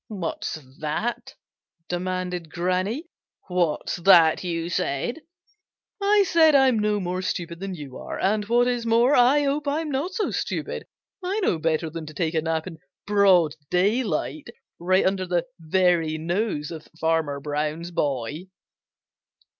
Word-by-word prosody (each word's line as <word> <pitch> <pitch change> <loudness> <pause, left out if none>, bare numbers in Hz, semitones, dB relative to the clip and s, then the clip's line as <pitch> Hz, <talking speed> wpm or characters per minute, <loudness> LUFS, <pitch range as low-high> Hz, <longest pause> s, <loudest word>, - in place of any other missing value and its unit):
"What's 185 -6 -4 0.2
that?" 155 +11 -3 0.5
demanded 180 -1 -3
Granny. 185 - -1 0.4
"What's 175 -4 0
that 170 -3 +6
you 165 -2 -2
said?" 175 - -2 0.8
"I 405 0 +4
said 320 -3 +5
I'm 265 -4 +5
no 210 0 +1
more 185 0 -2
stupid 170 -2 -4
than 195 -1 -5
you 145 -5 -9
are, - - -6
and 210 +2 +1
what 240 +2 +3
is 245 -1 0
more, 235 +4 +4
I 260 +4 +5
hope 285 +1 -1
I'm 300 +2 -1
not 290 +8 -2
so 420 - -1
stupid. - - -3 0.4
I 385 +4 -1
know 175 - +1
better 160 0 0
than 160 -1 -6
to 155 - -10
take 160 +1 -1
a 160 - +1
nap 160 0 -1
in 165 -4 -9 0.3
broad 190 -6 +4 0.2
daylight 210 - 0 0.3
right 185 +2 +2
under 190 -1 0
the 175 -1 0
very 165 -1 +2
nose 170 -1 -2
of 160 -2 -8
Farmer 160 -3 0
Brown's 150 +4 -3
boy." 145 +2 -2
180 Hz, 145 wpm, -24 LUFS, 160-230 Hz, 0.8 s, that